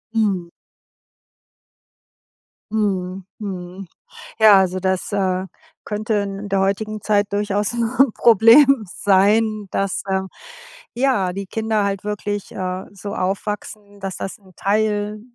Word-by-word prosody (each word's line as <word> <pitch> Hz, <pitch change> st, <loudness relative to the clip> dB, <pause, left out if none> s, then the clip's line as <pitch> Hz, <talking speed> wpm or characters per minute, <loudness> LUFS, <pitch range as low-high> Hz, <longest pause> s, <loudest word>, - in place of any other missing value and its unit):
Mhm. 195 Hz, -6 st, 0 dB, 2.2 s
Mhm, 190 Hz, -3 st, -1 dB
mhm. 185 Hz, -2 st, -7 dB, 0.5 s
Ja, 215 Hz, -3 st, +8 dB
also 185 Hz, -1 st, +1 dB
das, 190 Hz, 0 st, -1 dB
äh, 185 Hz, -2 st, 0 dB, 0.4 s
könnte 215 Hz, +1 st, -2 dB
in 200 Hz, 0 st, -3 dB
der 195 Hz, -1 st, +1 dB
heutigen 215 Hz, +2 st, -1 dB
Zeit 205 Hz, -1 st, +1 dB
durchaus 205 Hz, +1 st, 0 dB
'n 240 Hz, +2 st, +2 dB
Problem 235 Hz, +3 st, +6 dB
sein, 210 Hz, +2 st, +2 dB
dass, 195 Hz, -1 st, -1 dB
ähm, 190 Hz, 0 st, -1 dB, 0.7 s
ja, 240 Hz, -8 st, +1 dB
die 195 Hz, +1 st, -5 dB
Kinder 220 Hz, +1 st, -1 dB
halt 200 Hz, 0 st, -2 dB
wirklich, 205 Hz, -1 st, -4 dB
äh, 185 Hz, 0 st, -4 dB
so 200 Hz, 0 st, -7 dB
aufwachsen, 205 Hz, +1 st, -4 dB
dass 195 Hz, -1 st, -5 dB
das 190 Hz, -, -6 dB
'n 190 Hz, -3 st, -21 dB
Teil, 210 Hz, +1 st, 0 dB
205 Hz, 115 wpm, -20 LUFS, 190-215 Hz, 2.2 s, Ja